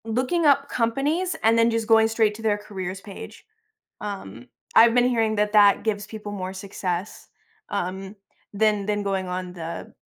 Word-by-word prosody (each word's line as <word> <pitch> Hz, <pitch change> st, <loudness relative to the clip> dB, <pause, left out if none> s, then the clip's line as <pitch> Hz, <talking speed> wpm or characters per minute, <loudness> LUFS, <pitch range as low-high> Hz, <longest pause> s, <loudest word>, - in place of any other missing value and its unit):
Looking 255 Hz, +9 st, 0 dB
up 280 Hz, 0 st, +4 dB
companies 285 Hz, +10 st, 0 dB
and 225 Hz, +1 st, +4 dB
then 230 Hz, 0 st, +4 dB
just 230 Hz, -1 st, -1 dB
going 225 Hz, -1 st, +5 dB
straight 225 Hz, -1 st, +1 dB
to 225 Hz, -, -10 dB
their 215 Hz, -2 st, +1 dB
careers 195 Hz, -2 st, -6 dB
page, 200 Hz, -2 st, -11 dB, 0.6 s
um, 125 Hz, -, -7 dB, 0.3 s
I've 230 Hz, 0 st, +7 dB
been 245 Hz, 0 st, +4 dB
hearing 225 Hz, -3 st, +1 dB
that 210 Hz, 0 st, 0 dB
that 205 Hz, -1 st, +5 dB
gives 205 Hz, -2 st, -1 dB
people 210 Hz, -2 st, -8 dB
more 185 Hz, -2 st, -5 dB
success, 190 Hz, 0 st, -5 dB, 0.4 s
um, 190 Hz, 0 st, -4 dB, 0.4 s
than 210 Hz, -1 st, +1 dB
than 205 Hz, 0 st, -1 dB
going 195 Hz, -1 st, -1 dB
on 180 Hz, 0 st, -5 dB
the 170 Hz, -1 st, -7 dB
210 Hz, 165 wpm, -24 LUFS, 195-230 Hz, 0.6 s, I've